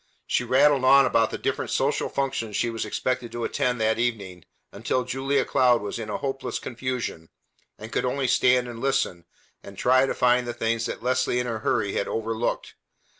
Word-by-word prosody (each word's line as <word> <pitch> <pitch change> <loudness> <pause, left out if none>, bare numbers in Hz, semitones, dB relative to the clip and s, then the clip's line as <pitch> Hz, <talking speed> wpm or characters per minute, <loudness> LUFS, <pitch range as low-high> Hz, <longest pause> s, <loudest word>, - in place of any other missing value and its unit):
She - - 0
rattled 135 +2 +3
on 140 +1 +7
about 115 -3 +2
the - - -5
different - - -2
social - - 0
functions 130 -6 -2
she 120 - 0
was 115 - -3
expected 125 -2 -2
to 120 - -4
attend 125 -1 -1
that 110 +1 +1
evening 100 -8 -3 0.3
until 120 +5 -1
Julia 135 +2 0
Cloud 125 -3 +3
was 105 - -4
in 110 -2 -6
hopeless 135 +4 -3
confusion, 120 -9 -5 0.5
and 110 +2 -10
could - - -1
only 130 +1 -1
stand 125 0 +3
and 120 -1 -8
listen, 135 -10 -1 0.4
and 100 -1 -12
try 130 +4 +3
to - - -2
find 125 0 +2
the 120 - -4
things 115 0 -1
that - - -6
Leslie 130 0 +1
in 125 - 0
her 115 -2 -3
hurry 100 -2 0
had - - -1
overlooked. 115 +1 -2
125 Hz, 185 wpm, -25 LUFS, 115-130 Hz, 0.5 s, on